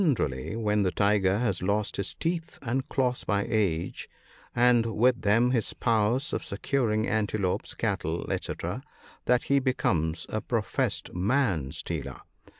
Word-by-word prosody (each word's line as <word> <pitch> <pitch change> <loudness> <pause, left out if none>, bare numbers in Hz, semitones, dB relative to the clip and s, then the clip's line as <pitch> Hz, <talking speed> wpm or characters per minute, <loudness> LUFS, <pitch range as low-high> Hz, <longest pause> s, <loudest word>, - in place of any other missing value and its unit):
147 75 - 0
rally - - -4
when 105 0 +2
the 95 - +2
tiger 100 0 +2
has 105 -6 0
lost 100 +3 0
his 100 - -3
teeth 165 0 -3
and 130 +2 -1
claws 125 -2 0
by 100 -1 0
age, 95 -7 -1 0.5
and 120 -2 +4
with 125 +2 +3
them 115 +5 +3
his 120 -4 0
power 110 -1 +2
of 140 +5 -3
securing 110 0 0
antelopes, 105 -3 -1
cattle, - - -1
&c, - - -2 0.7
that 125 0 +3
he 140 0 +3
becomes 85 - 0
a - - -2
professed - - -1
man 95 - +1
stealer. - - -4
110 Hz, 145 wpm, -28 LUFS, 100-125 Hz, 0.7 s, and